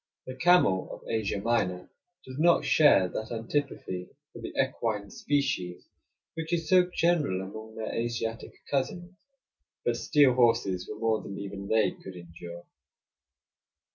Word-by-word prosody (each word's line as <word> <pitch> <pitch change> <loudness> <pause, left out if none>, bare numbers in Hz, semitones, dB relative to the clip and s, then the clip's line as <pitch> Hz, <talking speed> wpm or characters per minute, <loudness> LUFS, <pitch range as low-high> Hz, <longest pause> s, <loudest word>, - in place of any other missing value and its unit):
The 130 - -6
camel 130 - +3
of - - -10
Asia 110 -3 -1
Minor 100 -5 0 0.4
does 130 +2 -8
not 170 +2 +4
share 145 -12 +5
that 110 +5 -5
antipathy 115 -6 -3 0.2
for - - -10
the - - -6
equine 105 -3 -1
species 95 -12 -1 0.5
which 160 0 -5
is 165 -2 0
so 180 +1 +5
general 165 - +1
among 110 +4 -8
their 110 -1 -4
Asiatic 115 -1 -4
cousins; 175 +6 -2 0.7
but - - +2
steel 145 -4 +4
horses 115 -7 +2
were 105 - -6
more 110 0 +1
than 100 - -7
even 100 0 -6
they 110 0 +3
could 95 - -11
endure. 85 0 -10
115 Hz, 140 wpm, -28 LUFS, 95-145 Hz, 0.7 s, share